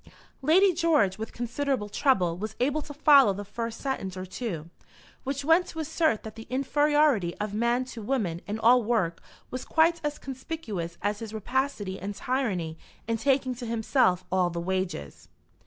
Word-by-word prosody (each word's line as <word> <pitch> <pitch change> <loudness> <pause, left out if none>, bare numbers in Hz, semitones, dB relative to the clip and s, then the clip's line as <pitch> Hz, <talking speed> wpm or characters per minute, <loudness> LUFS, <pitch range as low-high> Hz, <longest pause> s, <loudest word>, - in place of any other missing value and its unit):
Lady 360 +7 +5
George, 295 - +2
with 220 - -5
considerable 245 -1 -2
trouble, 195 -7 +2
was 215 +4 -5
able 285 +4 +1
to 290 - -9
follow 280 -6 +6
the 205 +2 -6
first 230 +2 -5
sentence 195 -9 -3
or 185 - -4
two, 185 -5 -5 0.6
which 275 +1 -3
went 330 +3 +4
to - - -10
assert 315 -6 0
that 220 - -7
the 225 0 -11
inferiority 275 - +2
of 210 -1 -3
man 235 +3 +1
to 240 -3 -8
woman 205 -8 -1
in 210 +1 -2
all 240 +3 +5
work 210 -7 0 0.3
was 255 0 -4
quite 330 +1 +3
as 295 0 -2
conspicuous 255 - -5
as 205 0 0
his 220 -1 -7
rapacity 220 -4 -2
and 200 +2 -5
tyranny 195 -13 -2 0.3
in 230 - +1
taking 265 +1 +1
to 245 -1 -7
himself 220 -5 +2
all 185 -1 +2
the 170 0 -4
wages. 180 - -3
230 Hz, 170 wpm, -27 LUFS, 195-275 Hz, 0.6 s, follow